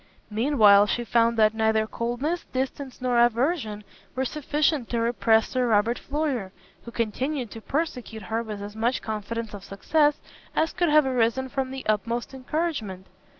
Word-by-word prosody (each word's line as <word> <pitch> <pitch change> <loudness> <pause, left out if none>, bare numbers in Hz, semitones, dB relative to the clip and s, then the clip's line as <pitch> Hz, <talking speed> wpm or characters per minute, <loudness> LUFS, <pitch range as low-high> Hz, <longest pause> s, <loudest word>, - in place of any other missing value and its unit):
Mean 255 +7 0
while 205 -2 +7
she 240 - -1
found 230 0 +2
that 215 -1 +4
neither 220 -1 +2
coldness, 245 +10 -3
distance, 265 0 -4
nor 245 -1 +2
aversion 240 -3 0 0.3
were 260 +1 0
sufficient 295 -1 0
to 235 - -1
repress 230 -1 +2
Sir 255 -1 0
Robert 225 +2 +2
Floyer, 280 -9 -2 0.3
who - - -7
continued 245 +3 -2
to 225 - -9
persecute 250 - -3
her 220 +5 -2
with 210 -3 -6
as 205 +1 -8
much 235 +3 0
confidence 220 +1 -4
of 200 -2 -8
success 295 - +1 0.4
as 320 +1 +1
could 350 -2 +1
have 300 -1 +5
arisen 260 0 +1
from 265 0 -2
the 265 0 -7
utmost 230 +4 -1
encouragement. 260 - -3
235 Hz, 160 wpm, -25 LUFS, 220-270 Hz, 0.4 s, while